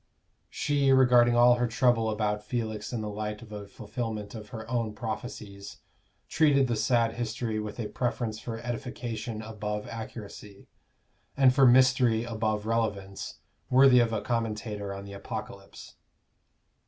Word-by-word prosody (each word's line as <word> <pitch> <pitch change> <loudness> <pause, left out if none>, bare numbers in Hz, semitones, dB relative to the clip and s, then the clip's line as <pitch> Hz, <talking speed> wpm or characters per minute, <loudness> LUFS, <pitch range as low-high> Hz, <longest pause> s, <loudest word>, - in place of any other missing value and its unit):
She, 140 -2 +1
regarding 125 -2 +5
all 120 +1 +6
her 120 0 +1
trouble 115 0 +2
about 105 -1 -1
Felix 110 -3 -3
in 120 -3 -3
the 105 - -4
light 105 +1 -4
of 110 - -14
a 105 -1 -7
fulfilment 110 -1 -5
of 105 -2 -9
her 110 -1 -8
own 115 -3 -2
prophecies, 105 -3 -6 0.5
treated 145 -4 +3
the 120 -2 -1
sad 115 0 +1
history 115 -1 -2
with 105 +2 -6
a 110 - -2
preference 115 -3 -2
for 115 -2 -5
edification 120 -2 -5
above 105 -1 -4
accuracy, 105 -3 -9 0.7
and 130 -2 +6
for 135 -1 +6
mystery 125 -2 +4
above 110 -2 -2
relevance, 105 -4 -3 0.3
worthy 130 -1 +7
of 120 -1 +2
a 110 - -2
commentator 110 -3 -3
on 100 0 -7
the 100 - -9
Apocalypse. 100 - -8
115 Hz, 140 wpm, -28 LUFS, 105-120 Hz, 0.7 s, worthy